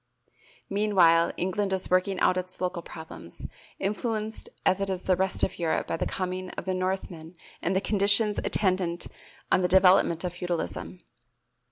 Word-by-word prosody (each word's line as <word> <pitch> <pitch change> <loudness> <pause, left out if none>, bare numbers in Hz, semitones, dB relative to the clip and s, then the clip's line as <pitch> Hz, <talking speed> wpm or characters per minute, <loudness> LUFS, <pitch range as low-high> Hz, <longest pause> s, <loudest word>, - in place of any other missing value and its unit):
Meanwhile 185 -5 +4
England 190 +2 -1
is 190 -1 -3
working 185 +1 +2
out 185 - +4
its 185 0 -4
local 180 -1 -2
problems, 160 - -10 0.3
influenced 215 +2 -3 0.2
as 190 - +3
is 190 -2 -2
the 185 - +2
rest 190 +1 0
of - - -1
Europe 165 -2 0
by - - -2
the - - -2
coming 185 0 -3
of - - -5
the 190 - -1
Northmen 185 -3 -4 0.3
and 185 +3 0
the 190 - +2
conditions 205 +1 +3
attendant 185 -3 0 0.5
on 185 - +4
the 180 - +2
development 180 -2 +5
of 180 -1 -3
feudalism. 130 - -4
185 Hz, 155 wpm, -27 LUFS, 175-195 Hz, 0.5 s, development